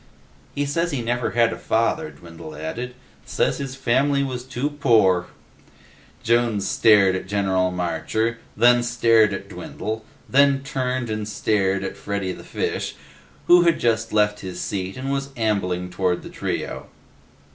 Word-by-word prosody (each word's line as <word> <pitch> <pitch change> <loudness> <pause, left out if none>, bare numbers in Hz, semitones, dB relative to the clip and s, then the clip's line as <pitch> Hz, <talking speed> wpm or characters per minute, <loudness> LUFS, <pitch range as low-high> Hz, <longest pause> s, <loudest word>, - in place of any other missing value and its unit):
"He 145 - 0
says 170 +4 0
he 140 -7 -2
never 120 +1 -1
had 120 -1 +2
a - - -8
father," 150 +8 0
Dwindle 80 -2 -11
added. 120 +12 -5 0.3
"Says - - 0
his 135 -2 -5
family 135 +2 +2
was 125 -2 -4
too 130 +3 -3
poor." 110 -11 +3 1.0
Jones 115 -4 +1
stared 100 -4 +5
at 95 - -5
General 95 -2 +1
Marcher, 90 +6 -2 0.2
then 120 +2 +5
stared 115 -2 +3
at - - -5
Dwindle, 110 +1 -6 0.2
then 140 0 +4
turned 130 -3 -2
and 110 -1 -3
stared 100 -2 0
at - - -5
Freddy 100 -2 -3
the - - -9
Fish, - - -3 0.5
who 175 0 +7
had 170 -1 +3
just 115 -1 +1
left 105 -1 +2
his 90 -1 -7
seat 95 +2 -3
and 135 +1 -3
was 140 0 -2
ambling 90 -5 -1
toward 90 -1 0
the - - -8
trio. - - -4
115 Hz, 150 wpm, -23 LUFS, 95-130 Hz, 1.0 s, who